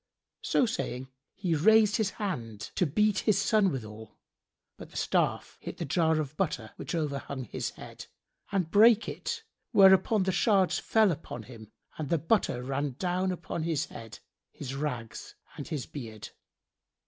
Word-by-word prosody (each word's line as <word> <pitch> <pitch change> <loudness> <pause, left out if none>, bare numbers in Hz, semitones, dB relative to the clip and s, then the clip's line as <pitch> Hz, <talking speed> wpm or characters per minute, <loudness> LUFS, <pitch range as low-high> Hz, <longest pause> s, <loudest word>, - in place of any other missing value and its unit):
So - - +2
saying, 130 - -3 0.3
he 185 -4 -1
raised 215 +6 +5
his 215 -4 +1
hand, 115 - -4
to 180 - +1
beat 210 +7 +2
his 215 -4 +2
son 210 -4 +3
withal 110 -4 -8 0.6
but - - -11
the - - -9
staff - - 0
hit - - -7
the - - -3
jar 160 +1 +2
of 150 -1 -4
butter 140 - -2
which - - -5
overhung 140 -4 -3
his 115 - -4
head, - - -11 0.4
and 185 -5 0
brake 225 +2 +6
it; - - -4 0.3
whereupon 190 +1 +6
the 190 - +1
shards 190 0 +3
fell 220 -3 +3
upon 145 -7 -6
him 110 -3 -12 0.3
and 150 -3 -3
the 170 - +3
butter 155 - +1
ran 135 +1 -2
down 185 +2 0
upon 175 -2 -4
his 160 -2 0
head, 115 -1 -10 0.3
his 135 -2 -7
rags 135 -5 -5 0.2
and 145 - -7
his 150 -7 -3
beard. 110 -7 -8
160 Hz, 160 wpm, -29 LUFS, 130-195 Hz, 0.6 s, brake